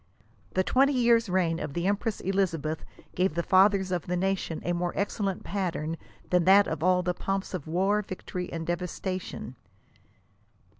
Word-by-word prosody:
" - - -32
The 185 - +3
twenty 275 +7 +3
years' 235 -3 +3
reign 175 -3 +1
of 140 - -5
the 170 +1 -1
empress 205 +2 0
Elizabeth 165 -5 -1 0.3
gave 180 -3 +1
the 170 - 0
fathers 190 0 +4
of 180 -3 -2
the 180 0 0
nation 190 -3 -1
a 175 - +1
more 175 0 -1
ex 200 +3 -2
cellent 195 -3 -1
pattern 170 -5 -2 0.4
than 180 -2 +3
tiiat 200 +2 +7
of 160 -2 -4
all 180 +1 +3
the 180 0 0
pomps 195 +2 -3
of 175 -6 -5
war, 195 +6 +2
victory 185 -2 -6
and 165 -1 -4
devas 175 +1 -3
tation." 185 -8 -4
185 Hz, 180 wpm, -28 LUFS, 175-195 Hz, 0.4 s, tiiat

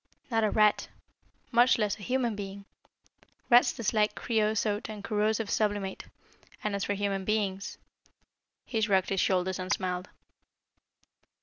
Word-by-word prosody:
"Not 225 -1 +2
a 215 - +3
rat 210 -1 +3 0.6
much 240 +2 +5
less 210 -1 -1
a - - -12
human 245 -1 0
being. 200 0 -7 0.9
Rats 240 +1 +7
dislike 215 -2 0
creosote 215 -2 0
and 210 -2 -7
corrosive 215 +1 0
sublimate, 205 -2 -1 0.6
and 210 - -1
as 200 - -2
for 205 - -1
human 200 -1 -1
beings 200 -1 -2 0.5
" - - -53
He 225 -3 -2
shrugged 195 -4 +2
his 195 -2 +1
shoulders 185 0 +1
and 185 +1 -4
smiled. 185 -1 -2
210 Hz, 135 wpm, -29 LUFS, 195-220 Hz, 0.9 s, Rats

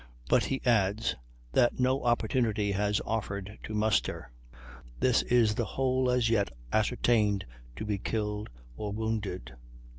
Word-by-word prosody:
But - - +3
he 135 - -3
adds 110 -2 +2 0.4
"that 120 - +3
no 130 +2 +2
opportunity 110 -3 +1
has 105 +1 +1
offered 100 -2 -3
to 110 - -6
muster 105 - 0 0.7
this 125 - +3
is 115 -3 +3
the 120 - -1
whole 130 -1 +2
as 125 -2 +2
yet 110 -3 +2 0.2
ascertained 110 -2 +2 0.3
to - - -5
be 105 -2 -1
killed 105 0 -2 0.3
or 105 +7 -4
wounded." 105 - -3
110 Hz, 130 wpm, -29 LUFS, 105-120 Hz, 0.7 s, But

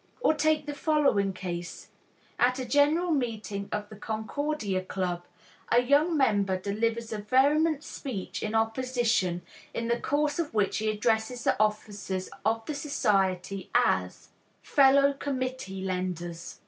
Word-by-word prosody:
Or 315 - +4
take 310 -1 +1
the 295 - -4
following 285 -10 +2
case: 175 -2 -6 0.5
At 250 +1 +3
a 260 - -3
general 300 +6 +3
meeting 220 -7 -2
of 210 0 -3
the 215 - -10
Concordia 220 -1 -2
Club, 180 -2 -3 0.5
a 235 - +6
young 295 +6 +3
member 205 -8 +2
delivers 225 +4 -2
a 215 - -3
vehement 285 +7 +3
speech 245 -11 -5
in 215 +1 -2
opposition, 225 -5 +1 0.3
in 230 0 -2
the 235 0 +1
course 295 +2 0
of 305 -8 -2
which 205 -2 +1
he 215 0 0
addresses 220 +2 0
the - - +3
officers 205 -3 -2
of 225 +1 0
the 305 - -3
society 195 -10 0
as: - - +1 0.3
"Fellow 280 0 +5
committee 255 -8 -4
lenders." 180 -2 -4
225 Hz, 135 wpm, -28 LUFS, 195-280 Hz, 0.5 s, a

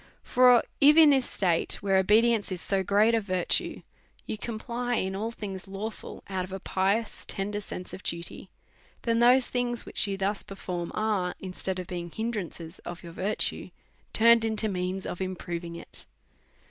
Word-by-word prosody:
For, 250 -1 +5 0.2
if, 295 +2 +7
in 315 -2 +9
this 265 -2 +2
state, 175 -4 0
where 195 -1 +3
obedience 215 +2 +3
is 185 - -3
so 195 +2 0
great 205 +4 +3
a, 225 - +3
virtue, 185 -3 0 0.4
you - - -3
comply 240 +2 -3
in 190 -3 -1
all 215 +3 -2
things 200 -4 -7
lawful, 200 +3 -7
out 190 -2 -2
of 185 - -9
a 190 - -4
pi 190 +3 +1
ous 225 - -10
tender 205 +1 -3
sense 180 -2 -7
of - - -7
duty, 170 -2 -4 0.5
then 230 -1 +1
tliose 250 +2 +5
things 245 -1 -1
which - - +1
you 195 -1 -2
thus 195 +1 -1
perform, 180 -3 -5
are, 205 -5 0
instead 190 0 -4
of 185 - -4
being 175 -1 -5
hindrances 190 -5 -4
of 175 0 -8
your 170 -1 -9
virtue, 195 +5 -1 0.4
turned 230 0 +6
into 220 -1 +1
means 185 -1 -2
of 180 - -5
improving' 175 -2 -4
it. - - -10
200 Hz, 170 wpm, -28 LUFS, 185-230 Hz, 0.5 s, in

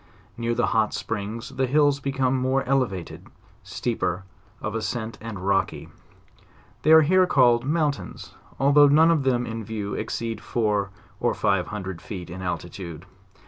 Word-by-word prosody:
Near 115 0 -1
the 120 - +2
hot 110 -1 +2
springs 110 +2 -4
the 130 -1 -1
hills 145 +1 +3
become 135 -2 0
more 130 +1 +1
ele 135 -1 +3
vated, 95 -5 -8 0.3
steeper 100 -6 -2 0.4
of 110 - -4
ascent 115 0 -3
and 110 -2 -6
rocky. 95 -1 0 0.9
They 155 - +3
are 160 0 +9
here 185 +4 +4
called 120 -5 +4
mountains, 150 -2 -2 0.3
although 145 +1 +6
none 160 +4 +5
of 160 -3 +2
them 125 -2 +1
in 115 -1 -5
view 105 -1 -4
exceed 115 -2 -4
four 105 -4 0 0.3
or - - +1
five 95 -4 +1
hundred 95 -4 -6
feet 90 -5 -7
in 95 +2 -7
altitude. 90 -2 -5
115 Hz, 150 wpm, -24 LUFS, 100-135 Hz, 0.9 s, are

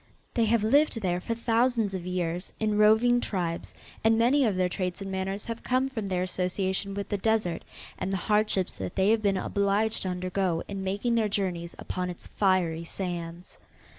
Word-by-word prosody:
They 230 - +2
have 225 -1 +2
lived 280 +2 +4
there 180 -2 0
for 230 - -2
thousands 230 -2 +1
of 180 -2 -4
years 180 0 -2
in 215 -1 +1
roving 220 +3 +5
tribes 175 -6 -3 0.3
and 225 0 +4
many 255 +5 +4
of 210 -4 +1
their 185 0 +2
traits 180 -1 -3
and 195 -1 -5
manners 195 +1 -3
have 230 0 -5
come 255 +1 +1
from 220 -6 -4
their 185 -1 0
association 190 +2 -1
with 200 -1 -3
the 205 - -1
desert, 210 -5 0 0.4
and 190 - -2
the 195 - 0
hardships 210 -1 +1
that 95 -1 -5
they 190 +2 +3
have 225 -1 +3
been 200 -2 +2
obliged 200 +3 +1
to 190 - -1
undergo 180 -1 -1
in 195 -1 -5
making 205 +5 0
their 225 -2 +2
journeys 180 -4 -2
upon 180 0 -3
its 175 - -8
fiery 180 -5 +1
sands. 175 -1 -5
195 Hz, 190 wpm, -28 LUFS, 180-220 Hz, 0.4 s, roving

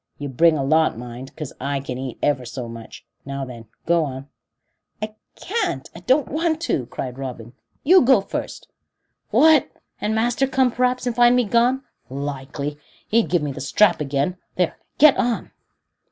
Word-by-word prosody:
You 145 -1 -5
bring 160 +5 +4
a 135 - -1
lot, 155 -1 +2
mind, 125 +2 -9
'cause 150 -4 -6
I 140 +1 -1
can 130 -2 -5
eat 130 -2 -5
ever 145 -3 +1
so 120 0 -6
much. 115 -1 -10 0.2
Now 140 0 -4
then, 120 -3 -10 0.2
go 170 -1 +3
on." 135 -1 -6 0.7
"I 215 0 -5 0.2
can't 385 - -3
I 170 - -10
don't 260 +10 +2
want 320 +1 0
to," 135 - -1
cried 125 +1 -6
Robin. 120 -3 -7 0.3
"You 365 +5 +7
go 260 -2 +5
first." 195 - -6 0.6
"What, 315 -4 +5 0.3
and 215 +1 0
master 240 +4 +1
come, 260 -1 +2
p'raps, 250 +1 0
and 245 -2 -1
find 240 +1 +5
me 250 - +3
gone! 240 +5 +2 0.3
Likely! 140 +1 -5 0.3
he'd 230 +1 +2
give 175 -4 +1
me 145 - -2
the - - -7
strap 175 +5 +3
again. 145 +5 -1 0.2
There, 180 -2 0 0.2
get 305 -1 +7
on." 240 -2 -1
160 Hz, 170 wpm, -22 LUFS, -, 0.7 s, You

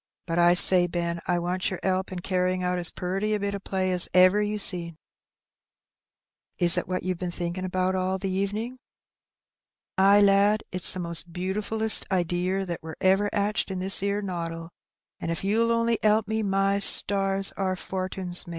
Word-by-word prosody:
"But 170 -1 -2
I 175 0 +4
say, 180 0 +5
Ben, 170 -1 -3
I 175 - +1
wants 180 +1 -2
yer 190 - -6
'elp 190 0 -1
in 185 - -6
carryin' 185 0 -1
out 180 0 -1
as 175 - -2
puriy 195 +4 -3
a - - -3
bit 200 0 -3
o' 200 - -4
play 190 -1 -3
as 180 -1 +1
ever 185 +3 +5
you 210 0 -2
seen." 170 -5 +4 1.6
"Is 175 -1 +4
it - - -2
what 185 0 -3
you've 185 -1 -3
been 180 - -4
thinking 175 +1 -5
about 185 0 -1
all 185 0 -2
the 195 +1 -5
evenin'?" 210 +6 -4 1.2
"Ay, 200 +2 +5
lad, 200 +1 +3
it's 180 -1 +3
the 185 - -6
most 170 0 -4
butifullest 210 +5 -2
idear 180 +1 -1
that 175 -2 -6
wur 160 0 -9
ever 195 +2 +2
'atched 205 +1 -1
in 190 - -5
this 190 +2 +1
'ere 200 +1 -2
noddle; 165 -3 -6 0.5
an' - - -5
if 165 +1 -4
you'll 225 +4 +1
only 230 0 0
'elp 215 0 +2
me, 220 +1 -2
my 195 0 0
stars! 195 -1 +5
our 190 -1 -3
fortin's 185 -1 -3
made." - - -10
185 Hz, 185 wpm, -25 LUFS, 180-200 Hz, 1.6 s, say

